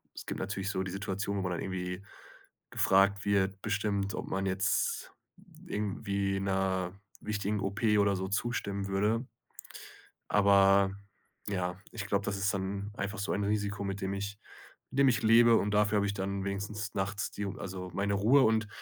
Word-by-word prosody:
es - - -8
gibt - - -4
natürlich 95 +1 -3
so 95 -2 -1
die 95 - -5
Situation, 100 +1 -3
wo - - -1
man 90 -1 -2
dann 90 - -2
irgendwie 90 0 -4 0.7
gefragt 100 +1 +3
wird, 100 -1 +1
bestimmt, 100 -2 -1
ob - - -5
man 95 0 -1
jetzt 95 0 0 0.5
irgendwie 100 -1 -1
'ner 95 -2 0 0.3
wichtigen 105 0 -1
OP 100 +4 -3 0.2
oder 100 -1 +3
so 95 0 -3
zustimmen 100 -2 -2
würde. 105 +5 +1 1.0
Aber, 100 -1 +5 0.6
ja, 90 -2 -2
ich 105 -3 -5
glaube, 100 -1 0
das 100 -1 -1
ist 100 +1 +1
dann 100 +1 -3
einfach 100 +2 -4
so 100 - -2
ein 100 - -1
Risiko, 105 0 -1
mit 100 0 -3
dem 95 0 -2
ich 100 +1 -4 0.5
mit 135 - -2
dem 140 - +6
ich 120 -2 +1
lebe, 115 +1 +7
und 105 - 0
dafür 105 0 +3
habe 100 - +2
ich 100 - -1
dann 100 0 -3
wenigstens 100 +1 -4
nachts 100 +1 -2
die 105 - -4
also 95 -1 -6
meine 100 +1 0
Ruhe. 115 +8 +5
Und 110 -1 +2
100 Hz, 170 wpm, -31 LUFS, 95-105 Hz, 1.0 s, lebe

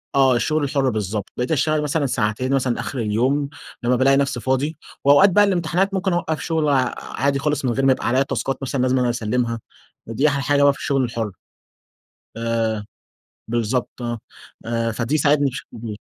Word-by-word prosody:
آه 135 -2 +5
الشغل 155 +5 0
الحُرّ 140 -1 +1
بالضبط، 105 -2 -3
بقيت 125 +3 -2
أشتغل 155 0 +2
مثلًا 150 0 0
ساعتين 125 +2 -1
مثلًا 130 -3 0
آخر 135 - -4
اليوم، 130 +7 0 0.3
لمّا 125 +1 +3
بالاقي 135 +2 +4
نفسي 140 -2 0
فاضي، 135 +5 -1 0.3
وأوقات 145 +8 +7
بقى 205 +3 +5
الامتحانات 190 +1 +1
ممكن 190 -1 0
أوقّف 160 -3 -1
شغل 160 -3 0 0.3
عادي 140 0 -1
خالص، 145 -1 -1
من 125 - +2
غير 135 +2 0
ما 135 - +6
يبقى - - -1
عليَّ 130 +3 +3
تاسكات 135 0 -2
مثلًا 135 -1 -2
لازم 130 0 +2
إن - - +2
أنا 125 - +2
أسلِّمها، 115 0 -1 0.5
ودي 130 +6 +1
أحلى 140 -1 0
حاجة 145 -1 +3
بقى 140 -1 +6
في - - -13
الشغل 135 -2 0
الحُرّ، 115 -3 -3 1.1
آآ، 115 -2 -1 0.6
بالضبط 120 +2 -2 0.6
آه، 115 0 0
فدي 125 +7 -1
ساعدني 145 -1 +3
بشكل 125 -2 -9
كبير 110 -2 -6
135 Hz, 180 wpm, -21 LUFS, 120-145 Hz, 1.1 s, وأوقات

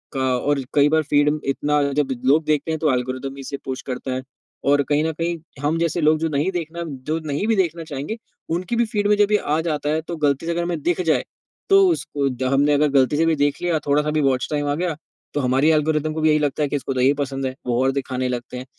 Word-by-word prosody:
क 130 -2 +1
और 145 -1 +2
कई 145 0 +5
बार 160 +1 +2
फ़ीड 145 0 +3 0.2
इतना 145 +2 +1
जब 145 -1 0 0.2
लोग 150 +5 +4
देखते 155 +1 0
हैं 160 - -2
तो 155 -2 +2
एल्गोरिदम 130 +2 -3
भी 140 - -8
इसे 140 +1 -5
पुश 130 -1 -4
करता 130 +1 -4
है। 130 - -2 0.4
और 145 0 +4
कहीं 150 +1 +2
न 160 - 0
कहीं 170 0 0 0.3
हम 155 +3 +1
जैसे 170 +1 0
लोग 155 0 +4
जो 165 0 0
नहीं 150 +5 0
देखना, 170 -1 -4
जो 155 +1 -4
नहीं 150 +7 -1
भी 225 - +3
देखना 170 -4 0
चाहेंगे, 150 +7 -5 0.3
उनकी 180 +7 -1
भी 235 0 +2
फ़ीड 210 -3 -1
में 210 - +4
जब 205 0 +3
ये 210 - +5
आ 155 -3 -1
जाता 150 -3 -2
है 155 +1 +1
तो 170 +2 -6
गलती 145 0 +1
से 170 - -1
अगर 170 +1 -1
हमें 170 -3 -3
दिख 175 +1 +1
जाए 160 - +2 0.4
तो 390 -1 +6
उसको 145 - -1
द 130 0 -4
हमने 145 +2 +3
अगर 150 +1 +3
गलती 135 0 +3
से 165 - +3
भी 165 -1 +3
देख 145 -1 +1
लिया, 175 -3 +1
थोड़ा-सा 150 +1 +1
भी 155 0 +1
वॉच 130 -3 +1
टाइम 145 -1 -1
आ 145 - +1
गया, 170 0 -1 0.4
तो - - 0
हमारी 130 +4 +3
एल्गोरिदम 155 0 +1
को 160 - -3
भी 155 - +4
यही 150 0 +4
लगता 150 0 0
है 145 - 0
कि - - -2
इसको 135 -1 -2
तो 130 - -1
यही 135 +2 +5
पसंद 135 -1 -3
है, 130 0 -3
वो 120 +1 +1
और 135 - +3
दिखाने 130 -2 -2
लगते 125 0 -5
हैं। 125 - -7
150 Hz, 265 wpm, -22 LUFS, 135-160 Hz, 0.4 s, तो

